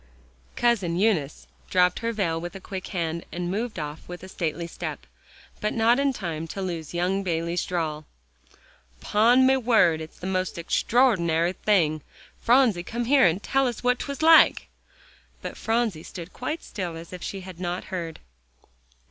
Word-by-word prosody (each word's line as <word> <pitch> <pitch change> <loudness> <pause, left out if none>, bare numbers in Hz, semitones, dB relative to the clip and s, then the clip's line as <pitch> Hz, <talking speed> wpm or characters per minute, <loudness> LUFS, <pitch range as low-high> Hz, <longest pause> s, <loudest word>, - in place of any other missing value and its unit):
Cousin 205 -8 +1
Eunice 180 -8 0 0.2
dropped 180 -1 +3
her 230 0 -1
veil 170 -7 -1
with 175 +1 -6
a - - -6
quick 190 0 -7
hand, 170 -3 -3
and 175 0 -3
moved 220 +3 -3
off 150 -1 -6
with 175 +1 -8
a - - -8
stately 170 -2 -3
step, 165 - -6 0.5
but 210 -1 -1
not 230 +3 +4
in 280 0 +2
time 165 -9 -4
to 195 - -7
lose 170 -3 -5
young 185 +3 0
Bayley's 170 -1 -1
drawl: 155 -4 -3 0.9
"'Pon 235 - +4
me 265 +1 +5
word 220 -10 +3
it's 155 - -10
the - - -8
most 185 -1 -1
extraordinary 175 -3 +2
thing. 165 -8 +1 0.4
Phronsie, 240 -7 +4
come 235 +6 -4
here, 270 -3 +5
and 175 +4 -1
tell 270 -1 +2
us 240 -1 -4
what 250 0 +2
'twas 280 +1 -4
like." 325 0 +6 0.7
But - - -5
Phronsie 225 -7 0
stood 170 +1 -9
quite 305 +6 -4
still 175 -5 -5
as 165 +2 -10
if 180 - -7
she 195 - -5
had 185 -2 -10
not 175 0 -3
heard. 170 -3 -4
185 Hz, 165 wpm, -25 LUFS, 170-230 Hz, 0.9 s, like